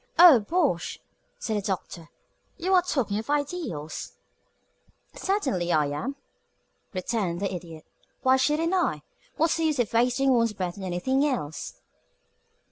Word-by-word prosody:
"Oh, 335 -7 +9
bosh!" 275 - 0 0.4
said 220 -2 -2
the - - -1
Doctor. 180 -4 -4 0.5
"You 370 +3 0
are 365 - +7
talking 250 - -1
of 225 - -8
ideals." 285 - -3 1.0
"Certainly 265 - -1
I 155 -2 +3
am," 245 - -3 0.8
returned 185 -2 -2
the 200 -1 -2
Idiot. 165 -3 -8 0.4
"Why 260 0 +5
shouldn't 310 +6 +1
I? 245 - +1 0.3
What's 325 +1 +2
the 325 - 0
use 305 -2 +1
of 240 -3 0
wasting 250 +3 +3
one's 230 -2 +2
breath 180 -3 -3
on - - -7
anything 190 +10 0
else?" 235 - -3
235 Hz, 135 wpm, -26 LUFS, 180-295 Hz, 1.0 s, Oh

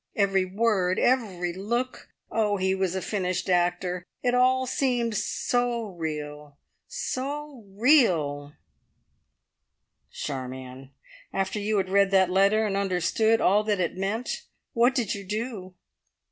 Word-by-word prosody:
Every 195 -2 +2
word 190 -2 +1
every 195 -9 +1
look! 235 +7 -3 0.2
Oh, 210 -2 +1
he 190 0 +1
was 190 -1 -1
a 190 - -2
finished 185 -1 -2
actor! 180 0 0 0.2
It 245 -1 +2
all 255 +1 +3
seemed 245 -3 0
so 235 +2 -1
real 150 -4 -6 0.3
so 290 - -5
real 165 - +3 0.8
" - - -52
"Charmion, 130 -1 -6 0.4
after 195 +2 -1
you 210 +1 0
had 190 -1 0
read 200 0 +4
that 190 -2 +3
letter 200 +3 +3
and 200 -2 -1
understood 200 +4 +1
all 205 +3 +4
that 210 -3 0
it 175 -3 -1
meant, 200 +6 -3 0.3
what 240 +3 +3
did 230 -6 0
you 200 - -6
do?" 205 -2 -5
195 Hz, 130 wpm, -26 LUFS, 180-230 Hz, 0.8 s, read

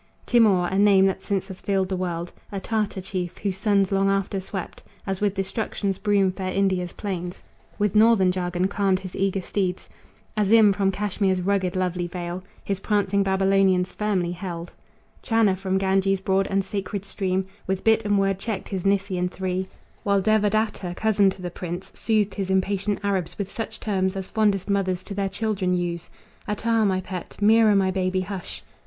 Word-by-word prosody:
Timour 205 -7 +4
a 190 +1 0
name 200 -2 +6
that 190 0 0
since 195 -2 -2
has 190 - -9
filled 195 -2 0
the 190 - -1
world, 175 -1 -3 0.2
A 200 - -3
Tartar 210 -1 -2
chief, 180 -2 -4
whose 195 -2 -3
sons 200 -2 +2
long 195 0 +2
after 195 0 0
swept 190 0 -6 0.2
As 190 -1 -3
with 205 -1 +1
destruction's 195 0 -2
broom 200 -3 +2
fair 185 0 -4
India's 185 -2 0
plains 180 -3 -5 0.4
With 210 -2 +1
northern 215 -4 +5
jargon 180 0 -1
calmed 195 -2 +1
his 185 -1 -8
eager 195 -1 0
steeds; 185 -1 -2 0.5
Azim, 210 0 +5
from 195 -1 +1
Cashmere's 195 -1 0
rugged 190 -1 0
lovely 180 -1 -1
vale, 175 +1 -5 0.2
His 195 -1 -2
prancing 200 -1 +1
Babylonians 190 -1 +2
firmly 195 -5 0
held; 175 -1 -6 0.5
Channa, 225 -4 +3
from 190 0 -1
Ganges' 195 0 +2
broad 190 0 +1
and 195 -1 0
sacred 200 0 -4
stream, 190 -1 -1 0.2
With 190 0 -1
bit 225 0 +4
and 205 -1 +2
word 195 -1 +1
checked 210 -1 -4
his 190 -3 -3
Nisaean 195 -2 +1
three; 185 0 -3 0.3
While 200 -1 +2
Devadatta, 215 -3 +1
cousin 205 -2 +3
to 190 -1 -7
the 175 - -4
prince, 175 +1 -6
Soothed 215 -3 0
his 195 -2 -3
impatient 195 +2 +1
Arabs 195 -4 -1
with 200 -1 -4
such 225 - -5
terms 190 -2 0
As 190 -1 -4
fondest 205 -4 +1
mothers 190 -2 0
to 200 - -7
their 195 -1 -1
children 195 -3 -1
use; 170 -1 -3 0.4
"Atair, 220 +1 +1
my 185 -1 +1
pet! 185 -1 -7
Mira, 215 0 +5
my 190 -1 +3
baby, 185 0 0
hush! 190 -1 -6
195 Hz, 175 wpm, -24 LUFS, 185-205 Hz, 0.5 s, name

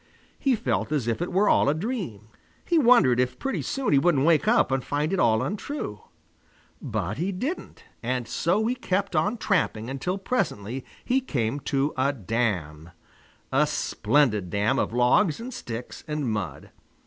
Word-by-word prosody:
He 270 -3 +2
felt 220 -7 -1
as 140 -7 0
if 115 +4 -1
it 175 - -2
were 195 +3 +3
all - - +4
a 145 - +2
dream. 165 - -4 0.4
He 340 -2 +3
wondered 235 - +5
if 125 0 0
pretty 270 - -2
soon 270 - -1
he 140 - +6
wouldn't 145 -3 +3
wake 160 -3 +3
up - - +4
and 135 -1 0
find 150 +5 -1
it 195 - +1
all 110 +1 +3
untrue. 200 - -4 0.8
But 105 +9 -3
he 185 +4 0
didn't, 260 - -5 0.2
and 125 0 -2
so 190 +7 +1
he 240 - +1
kept 200 -6 -2
on 205 +10 +1
tramping 135 - 0
until 180 +8 -2
presently 130 - -2 0.2
he 260 +2 +2
came 130 - -1
to 140 +2 +1
a 130 +2 +2
dam, 95 - -2 0.6
a - - +3
splendid 105 -5 +1
dam 105 +8 +1
of - - 0
logs 125 - +3
and 250 +3 -6
sticks 120 - -7
and 150 -3 -2
mud. 100 -10 -4
140 Hz, 170 wpm, -26 LUFS, -, 0.8 s, he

